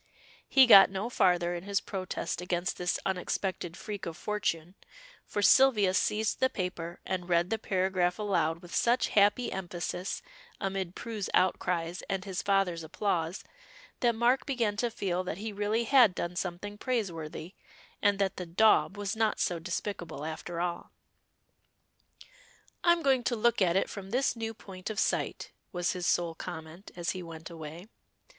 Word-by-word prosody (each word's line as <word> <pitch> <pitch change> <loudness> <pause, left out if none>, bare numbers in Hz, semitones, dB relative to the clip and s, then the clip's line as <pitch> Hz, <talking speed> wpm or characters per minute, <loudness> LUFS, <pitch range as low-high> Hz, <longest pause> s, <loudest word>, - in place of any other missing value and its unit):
He 270 -1 +7
got 200 -6 +9
no 195 +5 -4
farther 175 -5 +2
in 175 - -4
his 200 +1 0
protest 185 -2 -4
against 180 0 -1
this 180 0 0
unexpected 180 -2 -2
freak 210 -4 -6
of 165 0 -6
fortune, 180 -5 -2 0.5
for 205 - -2
Sylvia 215 -7 +5
seized 210 +2 +1
the 260 - +3
paper 175 -4 -4
and 180 -1 -3
read 175 +1 +2
the 225 - 0
paragraph 185 -3 0
aloud 180 -6 0
with 175 - -11
such 240 +2 +2
happy 210 +4 +3
emphasis 180 0 -4 0.4
amid 190 -2 -3
Prue's 220 -4 -4
outcries 180 -1 +1
and 190 0 -2
his 190 -1 -3
father's 195 -4 +1
applause, 170 +1 -2 0.6
that 235 -2 +2
Mark 240 +3 +2
began 235 -7 0
to 240 +2 +1
feel 185 -5 -2
that 180 -2 -4
he 215 +1 -5
really 210 +3 0
had 235 -6 +5
done 175 +1 -3
something 190 +3 -4
praiseworthy, 175 - -3 0.5
and 205 -1 +3
that 195 -2 0
the 180 - -5
"daub" 205 +3 +4
was 205 +1 -2
not 220 -1 +1
so 175 -2 0
despicable 170 -3 -4
after 165 +2 -5
all. 175 0 -3 1.9
"I'm 345 -1 +4
going 265 -3 +3
to 240 - +1
look 235 0 +2
at 175 -2 +3
it 195 - +2
from 195 -2 -8
this 250 +3 +1
new 225 -1 -4
point 185 -2 -8
of 220 -1 -3
sight," - - -1 0.2
was 175 -3 0
his 180 -1 -3
sole 170 -1 +1
comment 165 +2 -8
as 175 -1 -1
he 185 - -5
went 165 0 -9
away. 160 +2 -8
190 Hz, 160 wpm, -30 LUFS, 175-210 Hz, 1.9 s, got